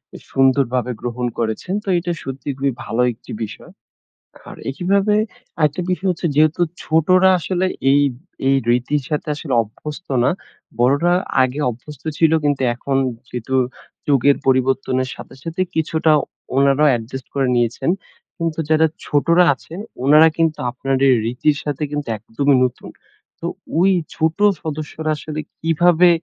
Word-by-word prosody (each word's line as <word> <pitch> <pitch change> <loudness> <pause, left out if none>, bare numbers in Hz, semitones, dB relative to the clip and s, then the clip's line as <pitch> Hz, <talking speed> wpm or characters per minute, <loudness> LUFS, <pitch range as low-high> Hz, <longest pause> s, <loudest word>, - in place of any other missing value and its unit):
উ - - -6
সুন্দরভাবে 130 -2 +2
গ্রহণ 125 0 -2
করেছেন। 115 - -2
তো - - -24
এটা 175 +1 -3
সত্যিই 135 +1 -5
খুবই 135 -1 0
ভালো 115 +2 -1
একটি - - -14
বিষয়। 105 - -9 0.8
আর - - -9
এখানে 195 +8 +1 0.4
আরেকটা 150 +4 +1
বিষয় 190 +1 -1
হচ্ছে 175 0 -2
যেহেতু 155 +3 +3 0.2
ছোটরা 185 +4 +4
আসলে, 185 +2 -1 0.2
এই, 140 +1 +5 0.5
এই 135 - +4 0.2
রীতির 125 +4 +1
সাথে 150 0 -2
আসলে 145 -2 -6
অভ্যস্ত 150 - -9 0.2
না। - - +4 0.5
বড়রা 145 +8 +3 0.3
আগে 130 +3 -1
অভ্যস্ত 130 +5 -11 0.2
ছিল, 160 -1 +4
কিন্তু 145 -2 +1
এখন 135 +2 -2 0.3
যেহেতু 125 +2 -5 0.5
যুগের 140 0 +4
পরিবর্তনের 130 0 +1
সাথে, - - -11
সাথে 165 +2 -4
কিছুটা 160 0 +1 0.4
উনারাও 140 +2 +4
অ্যাডজাস্ট 125 +1 -3
করে 135 -2 +1
নিয়েছেন। 120 +6 0 0.5
কিন্তু 165 -1 -2
যারা 160 +1 +5 0.2
ছোটরা 170 +5 +3
আছেন 165 +6 -11 0.3
উনারা 155 +3 +7
কিন্তু 165 -2 +1
আপনার 135 +2 -2
এই 130 - +6
রীতির 135 +5 +1
সাথে 145 0 -3
কিন্তু 145 -2 -4
একদমই 135 +6 +1
নতুন। 125 - -4 0.5
তো - - -4 0.3
ঐ - - +4 0.3
ছোট 160 +2 0 0.2
সদস্যরা 155 0 -4
আসলে 155 0 -5 0.2
কিভাবে 170 +2 +4
145 Hz, 140 wpm, -19 LUFS, 130-160 Hz, 0.8 s, উনারা